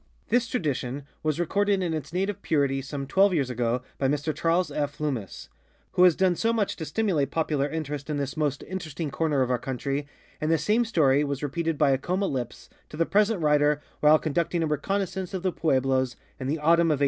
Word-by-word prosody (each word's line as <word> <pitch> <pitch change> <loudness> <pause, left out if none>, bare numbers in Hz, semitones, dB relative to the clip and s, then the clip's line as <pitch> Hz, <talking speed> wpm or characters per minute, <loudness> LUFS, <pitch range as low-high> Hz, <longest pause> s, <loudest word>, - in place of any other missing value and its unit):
This 235 -1 +2
tradition 145 - -2 0.2
was 155 0 -1
recorded 200 +3 +1
in 170 -2 -1
its 155 -2 -4
native 190 +2 -2
purity 140 -3 +1
some 135 +1 -5
twelve 190 +6 +3
years 135 -5 0
ago 120 +1 -1 0.2
by 135 - +2
Mr 145 +2 -1
Charles 170 -1 +1
F. 145 0 -3
Lummis, 130 - -4 0.4
who - - +1
has 175 -3 +6
done 185 -2 +2
so 230 +6 +1
much 220 -4 0
to 160 - -4
stimulate 155 -3 0
popular 150 -3 0
interest 150 -2 -4
in 150 - -1
this 140 -1 -3
most 145 -3 -1
interesting 165 -5 -5
corner 145 -2 +1
of 130 - -1
our 125 - +1
country, 135 +3 -3 0.3
and 155 - 0
the 165 - +4
same 215 +10 +2
story 150 -10 +3
was 140 -1 -3
repeated 165 +2 -1
by 145 -2 +4
Acoma 180 +9 0
lips 125 -8 -4 0.2
to 150 - -9
the 165 - +2
present 210 0 +2
writer 150 0 +3 0.2
while 150 +1 +6
conducting 165 +2 -1
a - - +2
reconnaissance 190 +4 -2
of 185 - -4
the 185 - +1
pueblos 130 -5 +1 0.2
in 130 - -4
the 150 +4 0
autumn 165 +2 +4
of 155 - +3
1895. - - -11
155 Hz, 205 wpm, -26 LUFS, 140-180 Hz, 0.4 s, has